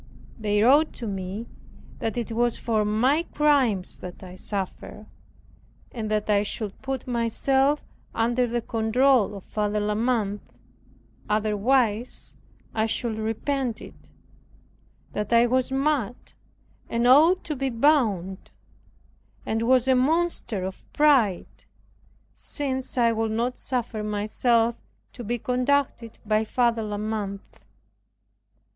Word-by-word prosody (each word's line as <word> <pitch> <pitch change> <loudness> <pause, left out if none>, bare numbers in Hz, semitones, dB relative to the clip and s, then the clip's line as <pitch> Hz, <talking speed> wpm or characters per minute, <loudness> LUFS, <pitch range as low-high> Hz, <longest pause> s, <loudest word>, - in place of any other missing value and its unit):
They 210 -1 +1
wrote 290 +6 +5
to 240 - -6
me 195 +2 -4 0.5
that 225 +1 -3
it 235 -1 -3
was 240 +1 +1
for 220 -2 0
my 245 +9 +2
crimes 280 - +1
that 180 +1 -9
I 180 -1 -9
suffered 200 +2 -5 0.9
and 220 -3 -4
that 215 -1 -1
I 205 -1 +3
should 210 -1 -5
put 265 -1 -4
myself 265 +4 +1 0.3
under 240 +2 +1
the 240 0 -2
control 230 0 +2
of 195 - -9
Father 210 0 -1
La 210 0 0
Mothe, 215 -3 0 0.9
otherwise 215 +2 0 0.4
I 220 0 +1
should 225 0 -2
repent 230 +2 -2
it; - - -14 1.0
that 210 0 -3
I 235 0 +6
was 255 +2 +1
mad 270 -4 -1 0.6
and 235 +1 0
ought 315 +9 +6
to 305 - -4
be 270 0 -1
bound; 230 - +1 1.0
and 225 +1 -1
was 255 +2 +3
a 260 - +5
monster 270 - +1
of 190 0 -6
pride, 260 -11 +2 0.7
since 265 -2 -2
I 235 -1 +4
would 225 -1 -1
not 240 +3 -1
suffer 240 -4 -3
myself 225 +3 +1 0.4
to 245 - -8
be 240 +3 -2
conducted 250 -1 -1
by 215 0 +2
Father 235 0 +1
La 210 -1 -4
Mothe. 210 -2 -3
230 Hz, 125 wpm, -25 LUFS, 210-260 Hz, 1.0 s, I